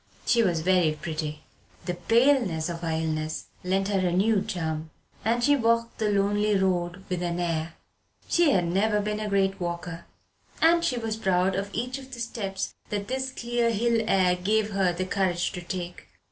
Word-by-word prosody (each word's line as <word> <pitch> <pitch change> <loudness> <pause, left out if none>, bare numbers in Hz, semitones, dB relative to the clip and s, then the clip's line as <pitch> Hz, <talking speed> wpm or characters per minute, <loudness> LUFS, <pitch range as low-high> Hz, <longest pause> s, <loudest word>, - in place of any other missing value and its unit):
She 235 - +4
was 175 -7 +1
very 180 -2 +3
pretty. 155 -2 -4 0.4
The 180 - -1
paleness 205 - +2
of 170 -1 -4
her 165 - -2
illness 160 -1 -2 0.2
lent 195 +2 0
her 190 -3 +1
a - - +1
new 200 +3 +3
charm. 160 -4 -3 0.3
And 235 +2 +1
she 290 +2 +5
walked 230 -2 +1
the 215 -1 +1
lonely 205 +1 +2
road 180 -1 0
with 180 -1 -2
an 175 0 -2
air. 165 -1 -2 0.5
She 340 -2 +4
had 185 -10 +3
never 205 +5 +2
been 210 +1 -2
a 215 -1 -3
great 195 -1 +1
walker, 170 -1 -4 0.5
and 335 +1 +5
she 250 - +1
was 225 -2 -2
proud 190 -2 +2
of 200 +1 -2
each 250 +5 -3
of 265 0 -13
the - - -10
steps 200 -5 -3 0.2
that 205 0 -3
this 260 0 -1
clear 240 -2 0
hill 230 +1 +1
air 185 -3 +3
gave 210 +4 +1
her 195 -2 +2
the 180 +2 -3
courage 185 -2 0
to 180 - -6
take. 175 0 -6
195 Hz, 185 wpm, -26 LUFS, 175-225 Hz, 0.5 s, she